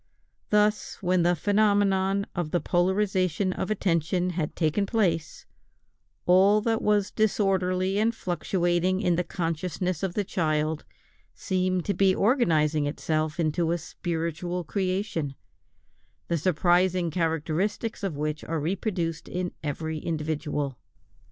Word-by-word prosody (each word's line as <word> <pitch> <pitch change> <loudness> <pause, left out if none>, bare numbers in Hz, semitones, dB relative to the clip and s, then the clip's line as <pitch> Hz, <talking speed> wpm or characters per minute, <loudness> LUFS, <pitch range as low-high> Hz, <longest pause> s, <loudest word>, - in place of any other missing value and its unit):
Thus, 210 0 +2
when 180 0 +3
the 175 +1 +3
phenomenon 200 0 +2
of 175 -3 -2
the 175 - +1
polarisation 185 0 +1
of - - -3
attention 180 -2 0
had 160 -3 -3
taken 170 +5 +1
place, 175 -8 0 0.8
all 190 +4 +5
that 225 0 0
was 205 -1 +2
disorderly 195 -2 +1
and 225 +2 +2
fluctuating 175 0 0
in 180 -4 +2
the 180 - 0
consciousness 170 0 -2
of 190 -3 -2
the 205 - +1
child 155 -5 -1 0.5
seemed 185 -2 -1
to 200 - 0
be 190 0 +3
organizing 155 - +2
itself 155 +1 -2
into 165 +1 +1
a 170 - +1
spiritual 170 +1 -3
creation, 185 -5 -2 0.9
the 170 - +1
surprising 175 +1 +2
characteristics 165 +7 -1
of 190 -7 -3
which 150 0 -2
are 165 0 -2
reproduced 170 0 -2
in 180 0 -3
every 155 +1 -3
individual. 150 -4 -3
180 Hz, 120 wpm, -26 LUFS, 160-195 Hz, 0.9 s, all